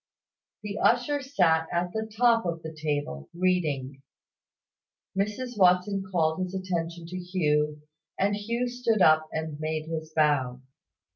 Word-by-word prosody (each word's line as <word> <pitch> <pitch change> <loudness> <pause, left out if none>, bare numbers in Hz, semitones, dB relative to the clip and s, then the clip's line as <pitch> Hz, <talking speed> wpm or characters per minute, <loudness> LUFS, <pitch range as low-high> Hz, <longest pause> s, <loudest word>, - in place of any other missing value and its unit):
The 205 -1 -4
usher 250 +5 +2
sat 175 -12 +2
at 175 +1 -1
the 220 0 -3
top 230 +1 +3
of 165 -1 -3
the 160 0 -6
table, 145 - -3
reading. 150 -7 0 1.1
Mrs 210 +4 -2
Watson 185 +2 +4
called 160 -1 +1
his 185 +1 -3
attention 170 -3 -3
to 180 +2 -6
Hugh; 150 -5 0 0.3
and 200 +1 +2
Hugh 235 +4 -2
stood 240 -5 +1
up 155 -1 +5
and 160 -2 -4
made 155 0 -2
his 160 -1 -5
bow. 140 -5 +2
175 Hz, 135 wpm, -27 LUFS, 155-205 Hz, 1.1 s, up